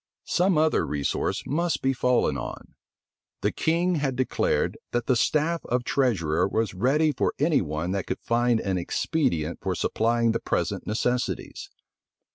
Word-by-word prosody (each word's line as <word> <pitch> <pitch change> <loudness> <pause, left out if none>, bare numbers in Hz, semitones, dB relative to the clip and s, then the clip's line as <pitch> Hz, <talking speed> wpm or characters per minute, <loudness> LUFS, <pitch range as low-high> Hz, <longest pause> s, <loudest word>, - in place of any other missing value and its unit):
Some 180 -1 +2
other 155 0 +3
resource 70 -2 -1
must 170 +4 -1
be 135 0 +2
fallen 125 -1 +2
on. - - -7 0.7
The - - +1
king 170 +2 +1
had 135 -3 -1
declared, 130 0 0 0.2
that 120 -1 0
the 130 - +2
staff 155 +7 +1
of 125 0 0
treasurer 90 - +1
was 110 +1 -1
ready 140 +10 +2
for 135 - -1
any 150 +1 +3
one 80 +1 -3
that 100 -1 -2
could - - -3
find 120 0 +2
an 95 -2 -1
expedient 85 - -1
for - - -1
supplying 115 0 +1
the 115 - -1
present - - -2
necessities. 125 +3 -2
125 Hz, 150 wpm, -26 LUFS, 100-150 Hz, 0.7 s, other